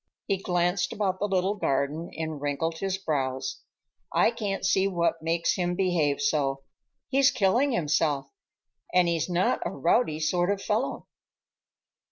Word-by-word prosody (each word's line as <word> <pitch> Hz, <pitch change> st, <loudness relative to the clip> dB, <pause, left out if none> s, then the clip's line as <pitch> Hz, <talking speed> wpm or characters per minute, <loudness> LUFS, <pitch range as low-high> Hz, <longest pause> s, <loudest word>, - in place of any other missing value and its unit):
He 195 Hz, -, 0 dB
glanced 180 Hz, 0 st, 0 dB
about 190 Hz, -3 st, -1 dB
the 205 Hz, -, 0 dB
little 190 Hz, 0 st, +1 dB
garden 145 Hz, -2 st, -1 dB
and 160 Hz, -2 st, -4 dB
wrinkled 160 Hz, +3 st, -2 dB
his 195 Hz, -1 st, -1 dB
brows. 135 Hz, -7 st, -2 dB, 0.5 s
"I -, -, +3 dB
can't 205 Hz, -5 st, -3 dB
see 190 Hz, 0 st, +3 dB
what 170 Hz, -3 st, 0 dB
makes 165 Hz, +1 st, +1 dB
him 175 Hz, -1 st, -1 dB
behave 175 Hz, -6 st, +1 dB
so. 140 Hz, -9 st, 0 dB, 0.5 s
He's 275 Hz, 0 st, +5 dB
killing 240 Hz, +8 st, +2 dB
himself, 150 Hz, -6 st, 0 dB, 0.6 s
and 180 Hz, -1 st, +4 dB
he's 170 Hz, 0 st, 0 dB
not 180 Hz, +1 st, +1 dB
a -, -, -2 dB
rowdy 155 Hz, -, +1 dB
sort 175 Hz, +3 st, +1 dB
of 200 Hz, -1 st, 0 dB
fellow. 215 Hz, +6 st, -2 dB
175 Hz, 145 wpm, -27 LUFS, 155-195 Hz, 0.6 s, He's